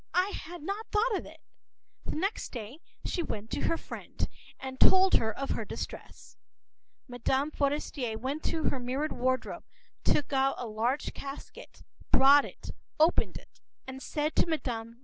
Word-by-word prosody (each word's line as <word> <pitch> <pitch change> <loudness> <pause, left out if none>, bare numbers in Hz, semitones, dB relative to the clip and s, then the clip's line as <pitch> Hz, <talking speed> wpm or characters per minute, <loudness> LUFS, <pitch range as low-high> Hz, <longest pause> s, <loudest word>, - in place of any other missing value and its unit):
I 365 +2 +4
had 345 -4 -7
not 400 +6 -3
thought 430 +2 +3
of - - -3
it.” - - -14 0.6
The - - -3
next 390 +7 -1
day 240 +4 -7 0.3
she 350 - 0
went 220 -8 -5
to - - -1
her 330 - +2
friend’s - - -4 0.3
and 260 0 -6
told 380 0 +7
her 220 -1 +4
about 275 +5 -3
her - - -1
distress. - - -7 0.7
Mme. 265 +3 0
Forester 280 -5 -1
went 270 +7 -2
to 320 - 0
her 270 - -2
mirrored 260 +5 -1
wardrobe, 255 +1 -1 0.4
took 290 -1 +2
out 270 0 +3
a 245 - -4
large 230 +6 -1
casket, 275 0 -9 0.3
brought 280 +2 +7
it, - - -8 0.3
opened 320 +3 +4
it, - - -17 0.2
and 265 0 -7
said 300 +2 -1
to - - +4
Mme. 235 -8 -2
275 Hz, 160 wpm, -30 LUFS, 250-320 Hz, 0.7 s, told